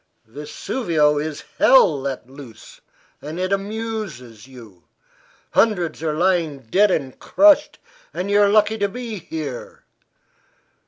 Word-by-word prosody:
Vesuvio 150 - -1
is 150 -1 -5 0.2
hell 160 - +5
let 135 -3 -5
loose; 130 -4 -14 0.4
and 155 +4 -7
it 185 +1 -1
amuses 195 - -5
you. 115 -9 -15 0.7
Hundreds 180 -9 +1
are 160 -2 -1
lying 170 -4 +1
dead 185 - +2
and 135 -8 -3
crushed; 300 0 +3 0.3
and 195 +2 -4
you 205 0 +4
are 200 - +4
lucky 215 +1 +2
to 200 0 0
be 230 -2 -6
here. 155 -6 -7
165 Hz, 120 wpm, -21 LUFS, 140-210 Hz, 0.7 s, hell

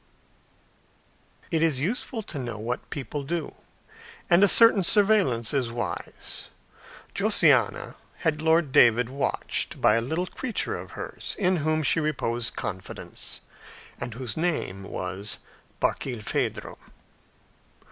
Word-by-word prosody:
It 160 - +1
is 160 -5 +2
useful 220 - -2
to 150 - -6
know 120 -4 -4
what 115 +3 -4
people 140 +1 -4
do, 155 +2 -3 0.8
and 175 +3 +6
a - - +8
certain 225 -1 +7
surveillance 190 - +3
is 130 -5 0
wise. 120 +1 -5 0.6
Josiana - - +3 0.2
had 155 -1 -1
Lord 160 -2 +3
David 120 -1 +5
watched 140 +1 -2
by - - +5
a - - +1
little 160 +9 -2
creature 240 +5 -1
of - - -8
hers, - - -6
in 185 -2 +2
whom 155 0 0
she 165 - +4
reposed 120 -7 -1
confidence, 95 -2 -6 0.6
and 120 -2 -5
whose 125 -2 -5
name 155 - -2
was 95 +3 -4 0.4
Barkilphedro. 120 -5 -2
145 Hz, 115 wpm, -26 LUFS, 120-170 Hz, 0.8 s, a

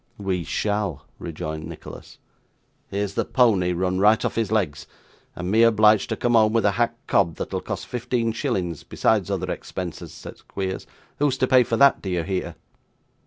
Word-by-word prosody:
'We 95 -4 -2
shall,' 105 -6 -2
rejoined 80 -2 -5
Nicholas. 85 -2 -10 0.7
'Here's 100 0 -2
the - - 0
pony 105 -9 +3
run 90 +1 0
right 105 +3 +4
off - - -1
his 110 -2 -1
legs, 75 -9 -1 0.5
and 90 +1 -4
me 110 +2 +4
obliged 110 -2 +5
to - - -1
come 120 - 0
home 110 -1 +5
with 115 -2 +2
a 100 - +4
hack 115 +3 0
cob, 85 -5 +2
that'll - - -4
cost - - -5
fifteen 120 -1 -1
shillings 95 - -2
besides - - +1
other - - -2
expenses,' 90 -3 -6
said - - -11
Squeers; 95 -1 -5 0.3
'who's 140 -2 +2
to 130 - +2
pay 130 -1 +5
for 115 -1 0
that, 140 +2 +5
do 95 - -5
you 90 -2 0
hear? 95 +1 -3
100 Hz, 175 wpm, -24 LUFS, 90-115 Hz, 0.7 s, obliged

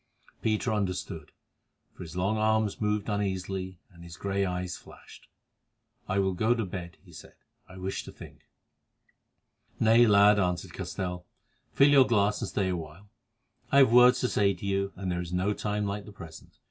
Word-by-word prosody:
Peter 110 +1 0
understood, 90 -6 -4 0.6
for - - -14
his 85 -1 -9
long 95 +4 0
arms 110 -1 0
moved 105 -1 -1
uneasily, 95 -2 -3
and 85 -1 -15
his 85 -1 -11
grey 100 0 -1
eyes 90 -1 -3
flashed. - - -15 0.8
"I 95 - 0
will 95 -1 +1
go 110 +6 +1
to 115 -3 -2
bed," 90 -3 -7
he - - -17
said; - - -13 0.3
"I 95 - -12
wish 95 +1 -4
to - - -9
think." - - -14 1.3
"Nay, 115 +2 +5
lad," 105 0 +5
answered 90 -1 -2
Castell, 90 -1 -5 0.5
"fill 140 +1 +6
your 140 -2 +6
glass 105 -2 +1
and - - -3
stay 95 -2 -1
awhile. 90 +3 -7 0.6
I 140 - +4
have 135 -4 +6
words 125 +1 +7
to 125 - +1
say 100 -4 +1
to 90 - -9
you, 100 0 -1
and 95 -1 -4
there 90 0 -2
is 85 -1 -7
no 95 +3 0
time 105 0 -2
like 100 0 -4
the 105 - -11
present. 85 -5 -13
100 Hz, 175 wpm, -28 LUFS, 90-105 Hz, 1.3 s, words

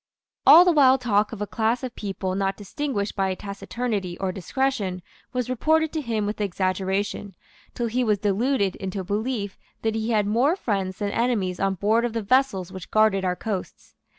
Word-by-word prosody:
All 350 +2 +10
the 360 - +5
wild 270 -4 +5
talk 215 -4 +1
of 210 -3 -4
a - - -2
class 225 +4 0
of 255 -2 -5
people 195 -2 -3
not 195 0 -1
distinguished 205 0 -3
by 190 -1 0
taciturnity 200 -1 -4
or 190 -1 -2
discretion 195 -2 -2 0.3
was 250 -2 -2
reported 315 +5 +1
to 315 - -1
him 225 -5 -1
with 210 +1 -3
exaggeration, 195 +1 -1 0.4
till 240 - -1
he 245 +2 0
was 215 -3 +2
deluded 205 +1 +1
into 190 0 -4
a - - -6
belief 205 +1 -3 0.2
that 220 -1 +1
he 220 +1 -2
had 215 -3 +2
more 245 - +2
friends 195 - -2
than 205 -1 -2
enemies 210 -7 0
on 195 0 +1
board 215 +5 +2
of 240 -2 -1
the 230 -1 -2
vessels 200 -6 +1
which 185 -2 -9
guarded 215 -3 +3
our 180 -1 0
coasts. 200 -1 -6
210 Hz, 185 wpm, -24 LUFS, 195-245 Hz, 0.4 s, All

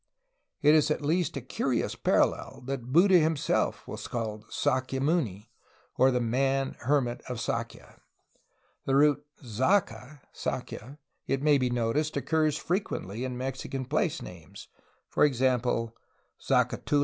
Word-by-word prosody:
It 150 +1 +7
is 155 -1 +4
at 150 0 -1
least 165 +1 0
a - - -4
curious 125 0 -1
parallel - - 0
that 130 -2 -4
Buddha 180 +4 +6
himself 160 -2 0
was - - -6
called 110 -3 -4
"Sakya 130 +1 0
muni," 130 - -1 0.4
or 130 - +5
"the 125 -1 +1
man 135 +3 0
(hermit) 130 -3 0
of 125 -2 -4
Sakya.'' 115 0 -5 0.8
The 135 - +1
root 145 0 +4 0.2
"Zaca'' 130 - 0
(Sakya), 135 +6 -5 0.3
it 135 +1 -1
may 150 -2 +5
be 125 -1 +1
noticed, 120 +6 0
occurs 155 -2 +1
frequently 125 - -3
in 125 -1 -4
Mexican 130 +1 -4
place 155 +4 -1
names, 85 -4 -11 0.5
e. 150 - +5
g. - - -6
Zacatula, 120 -2 +1 0.5
Zacatecas. 145 - +1
135 Hz, 135 wpm, -28 LUFS, 120-150 Hz, 0.8 s, It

